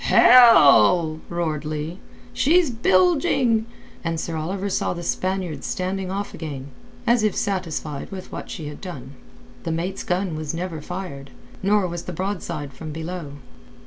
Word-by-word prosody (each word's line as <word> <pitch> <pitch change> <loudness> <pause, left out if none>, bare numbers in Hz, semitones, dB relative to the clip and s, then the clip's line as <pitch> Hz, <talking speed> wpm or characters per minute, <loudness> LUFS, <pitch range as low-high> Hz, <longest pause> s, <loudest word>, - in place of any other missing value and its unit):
"Hell!" 160 - +7
roared 160 -4 -2
Leigh. 155 +4 -4 0.3
"She's 325 0 +3
bilging!" 225 - +3 0.4
and 165 -1 -2
Sir 165 0 -4
Oliver 185 +6 -3
saw 190 - -1
the 175 - -6
Spaniard 185 -5 -2
standing 185 0 -2
off 200 +2 -4
again, 140 -4 -6 0.4
as 235 -1 +4
if 215 -2 +1
satisfied 165 -7 -3
with 190 -2 -8
what - - -7
she 155 -4 -6
had 150 - -8
done. 140 -9 -8 0.5
The 165 - -3
mate's 175 +4 -3
gun 180 -1 -1
was 155 0 -4
never 170 -2 -4
fired, 170 -6 -6 0.3
nor 200 0 +2
was 175 -1 -6
the 180 - -5
broadside 175 -6 -4
from 155 +3 -7
below. 160 -1 -6
175 Hz, 145 wpm, -23 LUFS, 155-195 Hz, 0.5 s, Hell